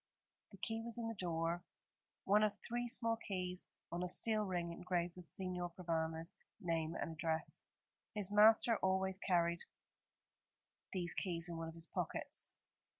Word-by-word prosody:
The 195 Hz, -, -13 dB
key 225 Hz, +3 st, -2 dB
was 230 Hz, 0 st, -5 dB
in 230 Hz, -1 st, -2 dB
the 225 Hz, -, -2 dB
door, 170 Hz, -2 st, -1 dB, 0.6 s
one 205 Hz, +2 st, +5 dB
of 215 Hz, -1 st, +2 dB
three 240 Hz, +1 st, -1 dB
small 230 Hz, -2 st, +2 dB
keys 180 Hz, -4 st, -3 dB, 0.2 s
on 170 Hz, +1 st, -2 dB
a 180 Hz, -, 0 dB
steel 215 Hz, +4 st, +3 dB
ring 175 Hz, -3 st, -1 dB
engraved 175 Hz, 0 st, -1 dB
with 180 Hz, -1 st, -9 dB
Signor 180 Hz, 0 st, -3 dB
Provana's 165 Hz, -2 st, -1 dB, 0.3 s
name 165 Hz, -3 st, 0 dB
and -, -, -2 dB
address. 160 Hz, 0 st, -2 dB, 0.5 s
His 205 Hz, -2 st, -2 dB
master 220 Hz, +2 st, +7 dB
always 190 Hz, 0 st, +1 dB
carried 170 Hz, -3 st, +2 dB, 1.3 s
these 175 Hz, -3 st, +3 dB
keys 170 Hz, -2 st, +2 dB
in 170 Hz, -, -4 dB
one 165 Hz, 0 st, -3 dB
of 165 Hz, -, -7 dB
his 165 Hz, 0 st, -3 dB
pockets. -, -, -3 dB
180 Hz, 150 wpm, -39 LUFS, 170-210 Hz, 1.3 s, master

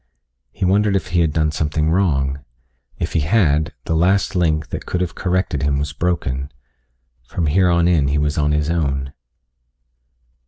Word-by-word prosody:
He -, -, -3 dB
wondered 100 Hz, +2 st, +2 dB
if 95 Hz, -, -2 dB
he 85 Hz, -, +1 dB
had 80 Hz, -2 st, +2 dB
done 75 Hz, 0 st, +1 dB
something 75 Hz, +1 st, -1 dB
wrong. 70 Hz, -7 st, 0 dB, 0.5 s
If -, -, -3 dB
he -, -, +2 dB
had, 80 Hz, -2 st, +2 dB
the 80 Hz, -, -1 dB
last 95 Hz, +3 st, +2 dB
link, 80 Hz, -4 st, +1 dB
that -, -, -6 dB
could 90 Hz, -, -1 dB
have 90 Hz, -1 st, -2 dB
corrected 90 Hz, -6 st, -1 dB
him 70 Hz, 0 st, +1 dB
was 70 Hz, +1 st, -3 dB
broken. 70 Hz, -5 st, -2 dB, 0.8 s
From 85 Hz, -, -2 dB
here 90 Hz, +5 st, +3 dB
on 85 Hz, 0 st, +3 dB
in 80 Hz, -6 st, +3 dB
he 70 Hz, +2 st, +1 dB
was 75 Hz, 0 st, 0 dB
on 75 Hz, -1 st, +1 dB
his 75 Hz, +1 st, 0 dB
own. 70 Hz, -4 st, -1 dB
80 Hz, 170 wpm, -20 LUFS, 75-90 Hz, 0.8 s, here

